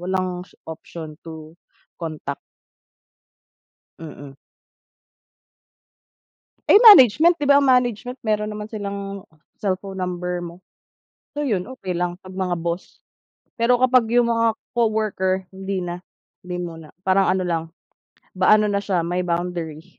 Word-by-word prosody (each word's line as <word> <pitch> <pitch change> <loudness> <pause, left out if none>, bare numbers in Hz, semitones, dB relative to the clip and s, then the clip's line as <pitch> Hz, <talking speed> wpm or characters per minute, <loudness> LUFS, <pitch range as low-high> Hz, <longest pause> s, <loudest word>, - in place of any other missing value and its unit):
Walang 185 0 -2 0.2
option 160 -1 -9
to 160 -1 -10 0.5
contact. 155 -4 -5 1.6
Mm. 145 -4 -10 2.3
Eh, - - +8
management, 335 - +8
di 290 - -1
ba 280 - +7
ang - - +1
management 250 0 +1
meron 210 -1 -1
naman 210 0 -6
silang 200 -2 -6 0.3
cellphone 195 -1 -3
number 180 -1 -3
mo. 170 +1 -10 0.8
So, 295 - -2
yun 205 -8 -1
okey 255 -8 -6
lang 175 0 -1
pag 185 - -11
mga 185 -2 -1
boss. 170 +2 -5 0.6
Pero 240 +1 +3
kapag 255 -2 +4
yung 240 -1 +4
mga 230 -1 +2 0.2
coworker 215 -5 0
hindi 190 0 -4
na, 175 0 -4 0.5
hindi 180 0 -4
muna 165 -3 -8
parang 190 +1 +3
ano 185 -1 -1
lang, 165 -2 -1 0.7
ba 185 +2 +3
ano 210 0 +1
na 200 - 0
siya, 190 -4 -1
may 175 +1 -1
boundary. 170 -1 -4
190 Hz, 125 wpm, -22 LUFS, 175-215 Hz, 2.3 s, Eh